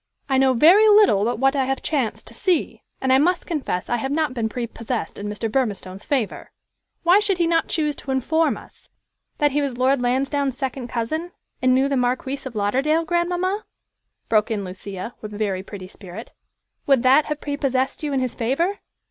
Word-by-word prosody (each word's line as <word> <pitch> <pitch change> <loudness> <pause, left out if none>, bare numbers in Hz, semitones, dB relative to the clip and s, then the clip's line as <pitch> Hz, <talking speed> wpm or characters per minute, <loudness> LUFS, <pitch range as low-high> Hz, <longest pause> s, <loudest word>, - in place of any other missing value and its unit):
"I 265 -1 +2
know 265 -1 +4
very 350 - +6
little 410 - +5
but 235 +3 0
what 270 +3 +2
I 270 -2 +1
have 270 +1 -2
chanced 265 -9 -1
to - - -7
see, 365 -4 0 0.2
and 265 0 +2
I 265 - +6
must 350 +4 +1
confess 280 - -3
I 240 - 0
have 265 +4 -3
not 310 -2 0
been 230 -3 -1
prepossessed 235 0 -4
in 205 - -4
Mr. 210 +2 -3
Burmistone's 205 -6 -2
favor. 260 -8 -2 0.5
Why 355 +4 +6
did 410 -3 0
he 345 - +2
not 330 -1 +2
choose 300 -3 0
to - - -10
inform 310 +5 +1
us" - - -16 0.5
"That 295 -1 +2
he 290 +2 +1
was 270 -4 -2
Lord 260 +1 +2
Lansdowne's 270 +2 0
second 265 -2 -3
cousin, 315 +10 -3 0.3
and 255 0 +4
knew 265 +1 +3
the 280 -1 0
Marquis 255 +2 -1
of 240 - -10
Lauderdale, 270 +11 +1
grandmamma?" 355 +4 0 0.6
broke 215 0 +2
in 210 -3 -2
Lucia, 190 +3 -7
with 210 -1 -7
very 200 -3 -1
pretty 190 -1 -9
spirit. 190 +3 -10 0.6
"Would 270 -3 +4
that 265 +4 +5
have 300 -1 -3
prepossessed 275 -2 -1
you 300 -2 -2
in 270 -1 0
his 255 -2 -2
favor? 330 - -1
265 Hz, 190 wpm, -22 LUFS, 230-305 Hz, 0.6 s, very